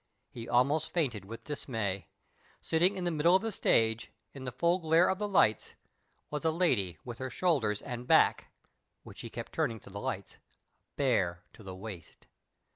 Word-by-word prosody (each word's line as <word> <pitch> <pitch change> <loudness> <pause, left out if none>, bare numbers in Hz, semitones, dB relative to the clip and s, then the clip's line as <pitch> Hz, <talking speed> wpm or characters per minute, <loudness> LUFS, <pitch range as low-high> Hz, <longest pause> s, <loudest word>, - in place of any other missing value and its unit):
He 115 -1 -8
almost 140 +6 +2
fainted 125 - -1
with 115 +3 -9
dismay. 110 - -3 0.5
Standing 175 +5 +2
in 185 - -3
the 175 - 0
middle 165 +3 +4
of 190 - +3
the 225 - -1
stage, 115 - +2 0.2
in 135 -2 -8
the 125 - -3
full 170 +8 +2
glare 165 +1 +4
of 190 - 0
the 210 - -1
lights, 140 - +2 0.6
was 150 +1 -3
a 160 - +3
lady 125 - +1
with 120 -2 -7
her 130 0 -3
shoulders 125 - +1
and 125 -1 -6
back - - +4 0.5
(which - - -12
she - - -6
kept - - -7
turning 115 -1 -1
to - - -14
the 100 +1 -6
lights) 100 -1 -5 0.6
bare 95 -11 +1
to - - -15
the 95 -3 -8
waist 95 -2 -10
125 Hz, 180 wpm, -31 LUFS, 110-165 Hz, 0.6 s, middle